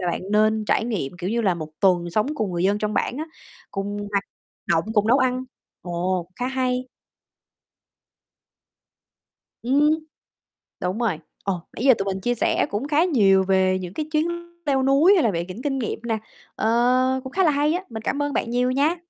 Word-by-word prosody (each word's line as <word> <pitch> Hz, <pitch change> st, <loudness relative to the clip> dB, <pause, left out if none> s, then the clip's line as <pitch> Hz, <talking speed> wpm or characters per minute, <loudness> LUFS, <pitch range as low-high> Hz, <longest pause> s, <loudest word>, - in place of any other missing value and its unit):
là 180 Hz, -1 st, 0 dB
bạn -, -, -3 dB
nên 215 Hz, 0 st, +3 dB
trải 220 Hz, -, +1 dB
nghiệm, 205 Hz, -, -2 dB
kiểu 180 Hz, +3 st, -3 dB
như 235 Hz, -, +1 dB
là, 195 Hz, -5 st, +2 dB
1 155 Hz, -2 st, -6 dB
tuần 175 Hz, -3 st, +3 dB
sống 215 Hz, +6 st, +1 dB
cùng 215 Hz, -9 st, -2 dB
người 175 Hz, 0 st, -1 dB
dân 200 Hz, +2 st, +2 dB
trong 210 Hz, 0 st, -2 dB
bản -, -, 0 dB
á, 310 Hz, -, -2 dB, 0.5 s
cùng 200 Hz, +1 st, -3 dB, 0.2 s
hoạt 200 Hz, 0 st, +1 dB, 0.4 s
động, 165 Hz, -, +2 dB
cùng 210 Hz, -1 st, +3 dB
nấu 255 Hz, +4 st, +5 dB
ăn. 255 Hz, -1 st, +1 dB, 0.4 s
Ồ, 175 Hz, 0 st, -2 dB
khá 245 Hz, -, -2 dB
hay. 255 Hz, -1 st, -1 dB, 2.7 s
Ừm. 280 Hz, +5 st, +3 dB, 0.9 s
Đúng 180 Hz, +4 st, -1 dB
rồi. 210 Hz, -10 st, 0 dB, 0.2 s
Ồ, 190 Hz, -3 st, -2 dB
nãy 235 Hz, -, -4 dB
giờ 265 Hz, -, +8 dB
tụi 195 Hz, -, -2 dB
mình 190 Hz, -1 st, -2 dB
chia 245 Hz, +4 st, 0 dB
sẻ -, -, +1 dB
cũng 215 Hz, +7 st, -3 dB
khá 300 Hz, +2 st, +3 dB
nhiều 200 Hz, -, +4 dB
về 190 Hz, 0 st, +2 dB
những 180 Hz, -1 st, -7 dB
cái 310 Hz, -, -3 dB
chuyến 310 Hz, +1 st, +2 dB, 0.4 s
leo 270 Hz, -2 st, +2 dB
núi, 280 Hz, +8 st, +5 dB
hay 340 Hz, -, +3 dB
là 225 Hz, -, +3 dB
về 170 Hz, -1 st, -2 dB
những 185 Hz, +6 st, -8 dB
kinh 270 Hz, -2 st, -1 dB
nghiệm 225 Hz, -, -3 dB
nè, 230 Hz, -2 st, -1 dB, 0.4 s
ờ, 250 Hz, +3 st, +2 dB
cũng 260 Hz, -, -7 dB
khá 380 Hz, -, +2 dB
là 320 Hz, -, +4 dB
hay 295 Hz, +2 st, +2 dB
á, 360 Hz, +2 st, -2 dB
mình 220 Hz, -2 st, -6 dB
cảm 285 Hz, -, -1 dB
ơn 290 Hz, 0 st, -2 dB
bạn -, -, -1 dB
nhiều 250 Hz, +1 st, +1 dB
nha. 285 Hz, +6 st, +2 dB
225 Hz, 200 wpm, -23 LUFS, 190-265 Hz, 2.7 s, giờ